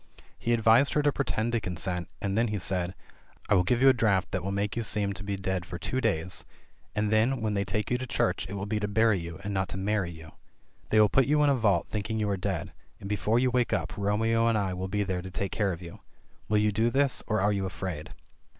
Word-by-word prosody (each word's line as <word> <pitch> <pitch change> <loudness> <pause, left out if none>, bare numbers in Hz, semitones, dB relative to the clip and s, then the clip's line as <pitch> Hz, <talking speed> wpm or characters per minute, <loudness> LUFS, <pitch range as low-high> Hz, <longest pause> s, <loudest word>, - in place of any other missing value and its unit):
He 120 - -1
advised 115 +4 +4
her 150 - +3
to 145 - +4
pretend 120 -4 -1
to 120 - +1
consent, 90 -2 -3 0.2
and 100 0 -1
then 115 +2 +2
he 105 -1 -2
said: 90 -1 -1 0.5
"I - - +4
will 95 - +5
give 120 +7 +1
you 135 - +8
a - - +6
draught 105 -6 +1
that 95 - -2
will 100 - -2
make 100 +1 -1
you 115 - -1
seem 105 -2 0
to 100 - -7
be 100 0 -2
dead 95 -2 -2
for 90 -1 -7
two 130 +8 -2
days, 85 -4 -1 0.5
and 105 0 0
then 115 +5 +3
when 110 -1 -1
they 100 -1 +1
take 105 +3 -2
you 125 - +1
to 130 - -5
church 120 -5 0
it - - -6
will 100 0 -3
be 105 +1 -1
to 105 - -1
bury 110 -1 +3
you, 85 -1 -7
and 100 +1 -3
not 95 -3 -1
to 90 - -3
marry 95 -1 0
you. 80 -2 -11 0.6
They 110 - +4
will 105 - +7
put 130 +6 +3
you 150 +1 +3
in 145 - +4
a - - +3
vault 100 -8 +2
think 105 -1 -4
ing 110 - -1
you 105 - 0
are - - +1
dead, 95 -2 -3 0.3
and 100 - -7
before 105 +2 +1
you 125 +1 +2
wake 125 -1 +1
up 80 -3 -2
Romeo 110 +3 +1
and 115 -1 +3
I 95 -3 -1
will 90 +1 -3
be 105 +2 0
there 95 -2 -2
to 95 - -8
take 95 +1 -3
care 105 -3 0
of 85 0 -6
you. 85 - -10 0.5
Will 105 - +3
you 105 0 +3
do 110 +3 +2
this, 135 +1 +1
or) 110 0 +1
are 105 +2 +2
you 95 -1 -1
afraid?" 90 -5 -5
105 Hz, 270 wpm, -28 LUFS, 95-115 Hz, 0.6 s, you